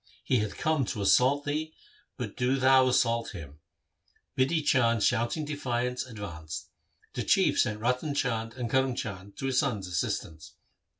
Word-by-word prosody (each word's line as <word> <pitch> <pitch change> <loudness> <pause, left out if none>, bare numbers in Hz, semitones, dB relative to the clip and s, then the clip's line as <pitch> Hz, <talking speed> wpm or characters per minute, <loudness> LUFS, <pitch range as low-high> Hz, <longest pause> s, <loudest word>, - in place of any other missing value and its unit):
He 130 - +2
hath 105 -1 -3
come 155 -3 +1
to 115 -3 -4
assault 135 +8 +4
thee, 155 +2 -3 0.4
but - - -5
do 125 +2 +1
thou 130 0 +5
assault 115 -3 +1
him.' 75 -5 -10 0.8
Bidhi 150 +4 +1
Chand 115 -6 +3
shouting 120 +7 +1
defiance 125 -4 -2
advanced. 85 -9 -7 0.4
The - - -3
Chief - - +3
sent 105 0 +1
Ratan 125 +5 0
Chand 115 -4 -1
and 125 -2 -3
Karm 130 +1 +1
Chand 100 -2 -6
to - - -4
his 130 -1 +2
son's 115 -9 -1
assistance. 80 -3 -3
125 Hz, 155 wpm, -28 LUFS, 105-135 Hz, 0.8 s, thou